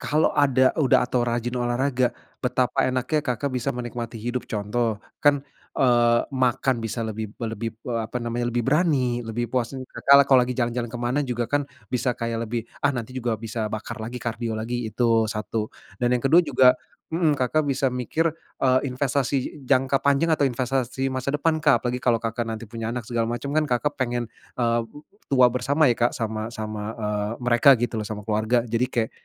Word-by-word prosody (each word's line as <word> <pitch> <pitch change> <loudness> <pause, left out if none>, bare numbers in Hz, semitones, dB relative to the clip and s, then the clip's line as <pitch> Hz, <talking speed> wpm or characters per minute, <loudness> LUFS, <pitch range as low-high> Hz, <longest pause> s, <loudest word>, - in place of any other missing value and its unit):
kalau 155 +2 +2
ada 130 -3 +4
udah, 135 -3 +4
atau 125 -1 0
rajin 120 0 -1
olahraga, 125 +1 +1 0.3
betapa - - +1
enaknya 130 +4 0
Kakak 135 +2 -2
bisa 125 -2 -2
menikmati 120 -1 -5
hidup. 120 +3 -4
Contoh, 110 +1 -1 0.2
kan 145 -1 +4 0.3
eee 120 -2 +4
makan 130 0 +1
bisa 115 +2 -3
lebih 110 -1 -5
lebih, 115 -1 -3
eee, 120 -2 -1
apa 125 - -6
namanya, 120 0 -2
lebih 120 -1 -1
berani, 135 -5 +2
lebih 115 +1 -3
puasin, 130 +1 -2
Kakak 140 0 +5
kalau 135 -2 +6
lagi 125 0 -3
jalan-jalan 120 -1 -1
ke 120 - -6
mana 120 +4 0
juga, 120 -2 -2
kan 145 +2 0 0.2
bisa 125 0 0
kayak 115 0 -2
lebih, 120 0 -1 0.2
"Ah, 145 - +5
nanti 125 -1 -5
juga 120 -3 -1
bisa 115 -1 -3
bakar 110 0 -5
lagi, 115 +3 -5
kardio 115 0 -3
lagi", 120 +2 -3
itu 115 0 +2
1. 110 0 -3 0.3
Dan 120 +3 +1
yang 125 - +2
kedua, 165 +6 +6
juga, 130 -3 +5 0.4
mhm, 165 -2 +3
Kakak 155 +5 +2
bisa 135 -1 0
mikir, 125 +6 -1 0.3
eee, 130 -1 +4
investasi 135 +1 -1
jangka 135 +1 +2
panjang 140 +3 +3
atau - - -1
investasi 130 0 -1
masa 130 +1 -2
depan, 155 +2 +1
Kak. 145 -5 +5
Apalagi 125 0 -2
kalau 120 -2 +3
Kakak 115 +1 -2 0.2
punya 115 0 -4
anak 120 -3 -5
segala 115 -2 0
macem, 120 +4 -4
kan 155 - +3
Kakak 145 +4 +1
pengen, 120 -2 -1 0.3
eee, 115 0 +2
m 115 - -18 0.4
tua 130 -2 +6
bersama 140 +5 +2
ya, 120 - +2
Kak, 120 0 +2
sama 110 0 -3
sama, 110 -1 -5
eee, 105 -1 -1
mereka 120 +3 +6
gitu 120 -1 -1
loh 110 - -2
sama 105 0 -5
keluarga. 110 +3 +2
Jadi 115 +2 +1
kayak, 115 -2 0
120 Hz, 185 wpm, -24 LUFS, 115-130 Hz, 0.4 s, kalau